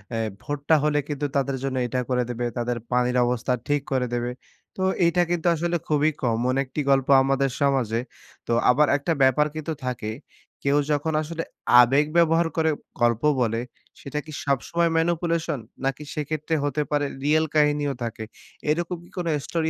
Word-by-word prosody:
আ - - -1 0.3
ভোটটা 145 +2 +1
হলে 150 -1 +2
কিন্তু 145 -1 -3
তাদের 135 -1 0
জন্য 135 -1 -2
এটা 125 +2 -2
করে 125 -1 +2
দেবে, 120 0 -2
তাদের 120 0 -1
পানির 125 0 +2
অবস্থা 125 +1 0
ঠিক 145 -1 +1
করে 130 -2 +1
দেবে। 120 0 -1 0.4
তো 190 - -2 0.2
এইটা 175 +1 +3
কিন্তু 175 0 0
আসলে 175 +2 0
খুবই 150 0 +3
common 120 +2 +1
একটি 135 +3 -4
গল্প 135 -1 +3 0.2
আমাদের 135 0 +1
সমাজে। 130 -5 +1 0.5
তো - - -2 0.2
আবার 145 +4 +5
একটা 165 +4 -1
ব্যাপার 130 +3 +4
কিন্তু 155 +1 -4
তো - - -26
থাকে 115 -4 -3 0.5
কেউ 140 +1 +3
যখন 150 +2 0
আসলে 165 +1 -4 0.4
আবেগ 135 +5 +4
ব্যবহার 165 0 +4
করে 160 0 +3 0.3
গল্প 120 -1 +3 0.2
বলে, 115 0 0 0.4
সেটা 140 +2 -4
কি 155 - -10
সবসময় 165 +5 +1
manipulation? 165 -3 0 0.3
নাকি 135 +2 -2
সেক্ষেত্রে 155 +1 -2
হতে 145 +1 0
পারে 145 -1 +1 0.2
real 155 +2 +3
কাহিনীও 145 -1 +2
থাকে? 115 -1 -4 0.5
এরকম 170 +3 0
কি - - -17
কোনো 170 -2 -1 0.2
story 160 -1 -1
145 Hz, 170 wpm, -24 LUFS, 125-160 Hz, 0.5 s, আবার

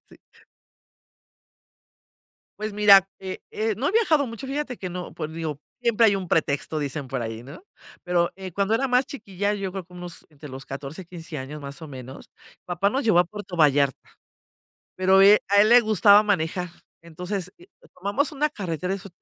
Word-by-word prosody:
Sí. - - -16 2.4
Pues 215 0 -3
mira, 200 -2 +6
eh, 190 -1 -6
eh, 220 0 -1
no 265 +6 0
he - - -2
viajado 325 - +3
mucho, 230 +4 -8
fíjate 275 -2 -3
que 185 - -6
no, 180 -2 -6
pues 155 -1 -6
digo: 160 -3 -4 0.2
"Siempre 235 -2 +3
hay 200 - +4
un 185 -3 -5
pretexto", 155 0 0
dicen 140 -1 -4
por 130 -1 -3
ahí, 115 0 -5
¿no? 140 - -12 0.4
Pero, 175 -1 +1
eh, 190 -2 -8
cuando 200 +4 0
era 270 +4 +1
más 250 +1 +2
chiquilla, 205 -6 -3
yo 195 -2 -4
creo 190 -2 -5
como 180 0 -14
unos 175 -1 -8
entre 150 -1 -12
los 130 +1 -9
14, 140 +6 -7
15 165 -1 -9
años, 145 +3 -7
más 140 +2 -9
o 155 - -8
menos, 130 0 -10 0.3
papá 180 +3 0
nos 270 +4 -1
llevó 215 -6 +4
a 180 - +5
Puerto 205 -1 -8
Vallarta 140 -4 +3 1.0
pero, 190 +1 +4
eh, 205 +1 +8
a 205 0 +5
él 215 - +4
le 245 +1 +8
gustaba 210 -1 +6
manejar. 180 -3 -1 0.3
Entonces, 180 +3 -5
eh, 355 - -17 0.3
tomamos 205 +10 -1
una 300 +1 0
carretera, 185 - -3
eso 195 0 -7
185 Hz, 185 wpm, -24 LUFS, 160-210 Hz, 2.4 s, eh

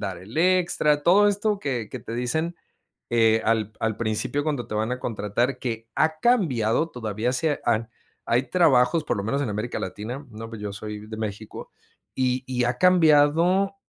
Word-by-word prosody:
dar 95 -4 -4
el 100 - -12
extra. 170 -4 +2
Todo 200 +6 +5
esto 205 +1 0
que 125 - -3
que 130 - -6
te 115 - -7
dicen, 160 +8 -1 0.6
eh, 115 -1 +3
al 110 -1 +1
p - - -33
al 110 -1 -1
principio 115 +6 -1
cuando 145 -6 -2
te - - -5
van 110 +3 -1
a 125 - -4
contratar, 120 +4 -1
que 115 -3 -5
ha 155 0 +1
cambiado, 160 - +2
todavía 110 +1 -2
se 145 +3 0
han 115 0 0 0.4
hay 120 +3 +2
trabajos, 155 -3 +4
por - - -1
lo 100 - -3
menos 140 +6 -1
en 125 - -2
América 105 +4 -3
Latina, 115 +9 -6
¿no? 115 +1 -8
Pues 115 -2 -8
yo 105 - -4
soy 105 +1 -7
de 110 - -7
México, 110 -1 -6 0.4
y 130 0 0
y 125 -1 -1
ha 120 +1 -1
cambiado, 175 +2 +4
125 Hz, 185 wpm, -24 LUFS, 110-155 Hz, 0.6 s, Todo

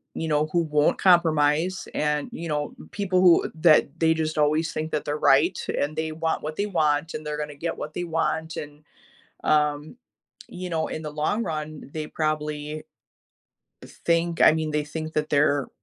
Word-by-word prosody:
you 160 - -3
know, 150 0 +1
who 170 +1 +2
won't 150 -2 +2
compromise 165 0 +3
and, 150 -1 0
you 165 +1 -6
know, 150 -1 -2 0.2
people 185 -3 0
who 175 -2 +5
that 155 -1 +4
they 160 -1 +4
just 155 -1 -2
always 155 +2 +1
think 155 +1 -3
that 150 - -2
they're 145 +1 -2
right, 155 +5 +3 0.2
and 150 +2 -1
they 160 0 -2
want 160 +1 -2
what 155 +1 -4
they 200 - -1
want, 155 -4 +1
and 155 - -5
they're 150 0 -3
gonna 150 0 -4
get 165 +4 -4
what 150 - -6
they 175 - -3
want, 160 -1 -2
and, 150 0 -8 0.6
um, 150 +3 +1 0.5
you 180 0 -6
know, 160 -1 0
in - - -5
the 150 - -5
long 155 +10 -1
run, 155 -4 -5
they 155 -1 -4
probably 150 -1 -3 1.0
think, 170 0 -1
I - - +9
mean, 155 -1 -1
they 150 -1 0
think 155 +1 -6
that 155 0 0
they're 145 -1 +2
155 Hz, 180 wpm, -25 LUFS, 150-165 Hz, 1.0 s, I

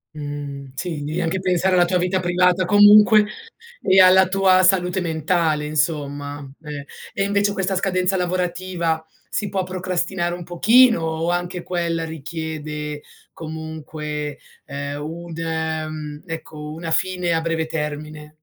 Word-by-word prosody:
Mh, 145 -2 -6
sì, 160 -1 -4
devi 155 +4 -3
anche 180 +2 -1
pensare 185 0 +2
alla 175 - +5
tua 180 +1 +1
vita 180 +1 0
privata, 180 +1 +2
comunque, 210 +2 +7 0.6
e 190 0 +4
alla 185 0 +7
tua 190 -1 +4
salute 180 0 +3
mentale 160 -2 0
insomma. 145 -2 -2
Eh, 145 -2 -7 0.3
e - - 0
invece 200 +1 +1
questa 190 -1 -1
scadenza 185 0 +1
lavorativa 180 -2 -1 0.2
si 205 -2 -2
può 190 -1 -1
procrastinare 185 -1 -2
un 175 0 -6
pochino 225 +5 +5
o 160 +1 -1
anche 175 0 -3
quella 170 -2 -2
richiede 155 -1 -5 0.3
comunque, 155 -2 -6 0.3
ehm, 140 +1 -5
un 165 +1 -7
ehm, 155 -2 -3
ecco, 155 -2 -7
una 165 0 -5
fine 180 0 0
a 165 - +1
breve 165 -1 -1
termine? 150 -1 -5
165 Hz, 135 wpm, -21 LUFS, 155-185 Hz, 0.6 s, comunque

